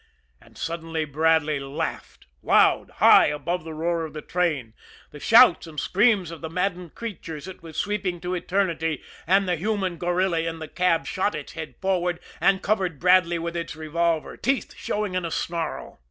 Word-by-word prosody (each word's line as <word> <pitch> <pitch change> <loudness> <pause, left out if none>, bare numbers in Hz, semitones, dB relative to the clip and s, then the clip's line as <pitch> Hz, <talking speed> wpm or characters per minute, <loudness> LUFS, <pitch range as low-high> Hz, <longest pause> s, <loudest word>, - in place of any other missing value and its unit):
And - - -19
suddenly 165 -1 -3
Bradley 155 0 +2
laughed 135 +1 -5 0.2
loud - - +4
high - - +7
above 170 +3 -2
the 160 -1 -7
roar 165 +1 -1
of 160 - -7
the 150 - -7
train, 155 -11 -1 0.4
the 150 - -10
shouts 225 - +6
and 155 -2 -6
screams 200 -4 +2
of 165 - -9
the 160 - -5
maddened 180 -1 -2
creatures 170 -8 -7
it 190 - -10
was 165 -2 -10
sweeping 200 -4 -1
to 180 0 -3
eternity, 170 -5 -1 0.2
and 195 +2 +3
the 175 -1 +1
human 190 -1 -1
gorilla 175 +1 0
in 165 0 -2
the 160 -1 -7
cab 175 -1 +1
shot 200 +2 -1
its 150 -2 -7
head 160 -1 -7
forward 180 -3 0 0.2
and 195 -1 +3
covered 190 -7 0
Bradley 180 0 +4
with 170 +1 -4
its 170 -1 -4
revolver, 160 +1 -1
teeth 265 -2 -1
showing 210 -2 -3
in 185 -1 -1
a 165 - -2
snarl. 165 0 -4
170 Hz, 175 wpm, -24 LUFS, 160-185 Hz, 0.4 s, high